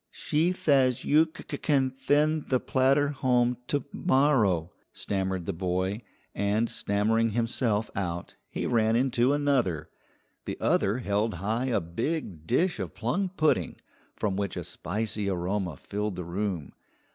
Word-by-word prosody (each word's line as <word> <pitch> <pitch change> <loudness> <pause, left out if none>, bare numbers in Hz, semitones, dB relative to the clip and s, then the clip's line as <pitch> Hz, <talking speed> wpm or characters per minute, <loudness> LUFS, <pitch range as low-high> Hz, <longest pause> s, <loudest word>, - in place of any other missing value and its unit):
"She 160 +4 0
thays 135 -8 +2
you 155 +2 +5
c 160 - -12
c - - -4
can 135 -4 +2
thend 145 +3 +1
the 130 - +3
platter 135 +3 +2
home 125 -3 +1
to 145 - 0
morrow," 110 - +2 0.2
stammered 95 -3 -2
the - - -2
boy, 95 +4 -1 0.3
and 105 +3 +1
stammering 110 +3 +1
himself 115 -2 0
out, 85 -3 -3 0.2
he - - -3
ran 115 -2 +2
into 125 0 +2
another. 125 - +1 0.5
The - - -4
other 100 +5 +2
held 105 -2 0
high 110 +8 -1
a 125 -5 +1
big 85 - -4
dish 165 - +1
of 95 -4 -5
plum 175 - -1
pudding, 155 - +1 0.4
from 100 -3 -1
which 100 -1 -2
a - - -3
spicy 105 -1 -3
aroma 90 -2 -2
filled 105 +3 -3
the 90 - -5
room. 90 -4 -3
115 Hz, 145 wpm, -28 LUFS, 95-135 Hz, 0.5 s, you